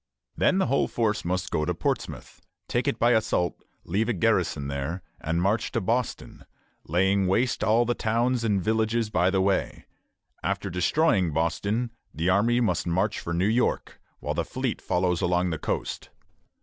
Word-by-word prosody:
Then 185 - +3
the 190 - +2
whole 135 +2 +1
force 110 -3 0
must 90 -1 -2
go 75 - 0
to - - -1
Portsmouth, - - -3 0.3
take - - -1
it - - 0
by 120 +1 +3
assault, 110 -6 +1 0.2
leave 105 +7 0
a - - +2
garrison 75 -5 +1
there, 70 +6 -4 0.2
and 80 +2 -1
march 105 +4 +1
to - - +1
Boston, 115 +5 -2 0.4
laying 95 +4 +2
waste 120 +7 +1
all 115 +3 +3
the 120 - +1
towns 120 +2 0
and 100 -4 +1
villages 110 +1 0
by 90 -1 +3
the 95 0 +1
way; 95 0 0 0.6
after - - -2
destroying 90 - +2
Boston, 100 +9 -1 0.2
the 80 +4 0
army 115 +6 +3
must 90 -8 0
march 95 +5 0
for 85 - -5
New 90 +3 +1
York, 115 +4 0 0.2
while - - -2
the - - -1
fleet - - -3
follows 90 -1 0
along 90 0 +1
the 80 - -3
coast. - - -3
100 Hz, 170 wpm, -26 LUFS, 90-115 Hz, 0.6 s, Then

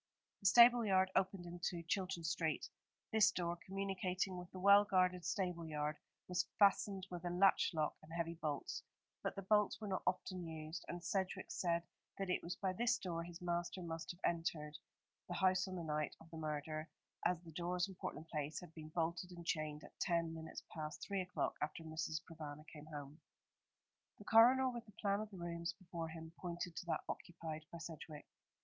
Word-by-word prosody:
The 195 - +2
stable 240 +3 +9
yard 190 -2 +4
opened 190 -1 +2
into 175 0 -3
Chilton 185 0 -1
Street. 160 -2 0 0.4
This 220 -1 +7
door, 170 -1 -1
communicating 190 -1 -1
with 180 -1 -6
the - - -9
well 200 +2 +8
guarded 185 -3 +3
stable 180 -3 -1
yard, 150 -1 -1 0.3
was 180 0 +1
fastened 200 -1 +4
with 175 -1 -5
a 175 - -1
latch 185 +3 +5
lock 155 -3 0
and 155 - -14
heavy 170 0 -1
bolts; 155 -4 -2 0.4
but - - -2
the 195 - -4
bolts 210 +1 +3
were 215 - -5
not 190 - 0
often 185 0 0
used, 160 0 -5
and 175 0 -5
Sedgewick 190 +1 -1
said 170 -1 +1 0.3
that 195 -2 -1
it - - +1
was 175 +1 -4
by 190 -2 -1
this 235 +3 +2
door 170 -4 -3
his 175 +1 -9
master 175 +1 -1
must 165 -1 -4
have 175 - -5
entered 160 -3 0 0.5
the - - -3
house 190 0 +3
on 185 - -4
the 175 - -3
night 150 -1 -1
of 165 +1 -16
the 165 - -7
murder, 155 +1 -3 0.3
as 180 -2 +3
the 165 - -10
doors 175 +3 0
in 195 - -8
Portland 165 -3 -5
Place 150 -1 -2
had 175 -3 -11
been 155 -1 -8
bolted 170 +2 -1
and 175 -2 -9
chained 155 -3 -1
at - - -14
ten 170 -2 +1
minutes 160 0 -6
past 155 -1 -5
three 200 -2 0
o'clock, 180 0 -1
after 155 +2 -2
Mrs. 160 0 -2
Provana 155 -2 -8
came 150 0 -10
home. 145 0 -7 1.0
The 205 - -12
coroner, 245 +5 +7
with 235 -2 -6
the 210 - -15
plan 200 0 +1
of 215 0 -4
the 195 - -10
rooms 170 0 -3
before 170 -3 -5
him, 160 0 -8
pointed 175 -1 -4
to 175 - -5
that - - +1
occupied 160 -2 -5
by 170 - -6
Sedgewick. 160 -2 -7
175 Hz, 195 wpm, -39 LUFS, 160-190 Hz, 1.0 s, stable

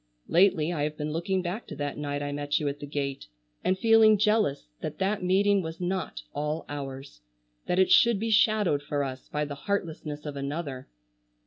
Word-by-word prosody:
Lately 175 -2 +3
I 155 - -2
have 150 +1 -2
been 150 0 -3
looking 180 +4 -1
back 185 +6 -4
to - - -7
that 145 -1 -3
night 145 -1 -3
I 145 - -3
met 145 0 -1
you 150 - -2
at 140 +1 -3
the 145 - -7
gate, 140 - -3 0.4
and 185 - +2
feeling 220 0 +6
jealous 210 - +2
that - - -5
that 195 +2 0
meeting 195 +2 +3
was 160 -1 -6
not 180 - -3
all 150 +2 -2
ours; 135 - -7 0.5
that 180 - +1
it 190 0 +4
should 235 -4 +6
be 225 +1 -1
shadowed 215 - +3
for 145 0 -2
us 130 -1 -6
by 150 0 -1
the 145 - -5
heartlessness 155 -2 -4
of 145 -1 -5
another. 140 -1 -4
155 Hz, 195 wpm, -28 LUFS, 145-190 Hz, 0.5 s, feeling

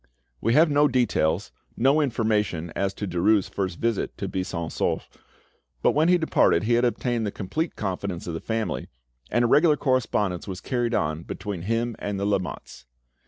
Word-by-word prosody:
We 115 +2 +2
have 160 0 +5
no 145 +1 +5
details, 105 - +1 0.3
no 135 +6 +4
information 105 - 0
as 100 0 0
to 100 - -4
Derues' 95 +3 +2
first 95 -3 -3
visit 115 -3 -1
to - - -3
Buisson 90 -3 -3
Souef, - - -1 0.8
but - - +5
when 155 +3 +2
he 180 - +6
departed 160 -8 +3
he 115 +3 +1
had 120 +1 +3
obtained 120 -1 0
the - - -2
complete 155 - -3
confidence 95 -2 -3
of 85 - -4
the 80 - -3
family, 110 -1 -3 0.4
and 120 0 +2
a - - +3
regular 150 +4 +5
correspondence 105 - 0
was 95 -2 -5
carried 120 +1 -1
on 75 +1 -1
between 95 +1 -5
him 115 +4 -1
and 100 -1 -3
the 100 - -1
Lamottes. 95 -9 -3
110 Hz, 175 wpm, -25 LUFS, 95-120 Hz, 0.8 s, he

